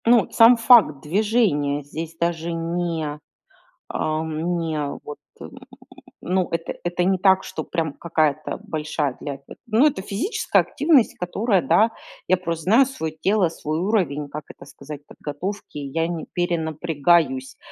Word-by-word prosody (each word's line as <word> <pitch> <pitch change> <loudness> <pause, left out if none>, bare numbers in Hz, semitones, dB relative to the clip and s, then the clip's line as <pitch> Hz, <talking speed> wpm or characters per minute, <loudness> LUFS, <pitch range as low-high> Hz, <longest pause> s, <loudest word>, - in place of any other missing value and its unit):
Ну, 235 -1 +5
сам 230 +1 +7
факт 230 - +5
движения 165 -6 +1
здесь 160 +3 -7
даже 170 0 -1
не, 165 -3 -3 0.7
ам, 160 +2 -2
не 160 -2 -2 0.2
вот, 150 - -8 0.2
м, - - -9 0.7
ну 185 0 0
это 165 0 -3
это 175 0 0
не 190 +1 +2
так, 190 0 +4
что - - -5
прям 160 -4 -2
какая-то 155 -3 -1
большая 150 -3 -2
для 140 -2 -5
те 140 - -14
Ну, 230 +6 +4
это 265 -11 0
физическая 220 - 0
активность, 290 -6 +2
которая, 195 +2 0
да, 215 +7 +3 0.3
я 185 - +3
просто 170 -3 -4
знаю 230 +8 +5
свое 160 - -5
тело, 200 -3 +2
свой 155 -1 -4
уровень, 170 -7 0
как 150 +2 -6
это - - -13
сказать, 145 +1 -10
подготовки. 170 +4 -6
Я 145 +4 -2
не 170 -2 -4
перенапрягаюсь, 160 -5 0
165 Hz, 140 wpm, -22 LUFS, 155-195 Hz, 0.7 s, сам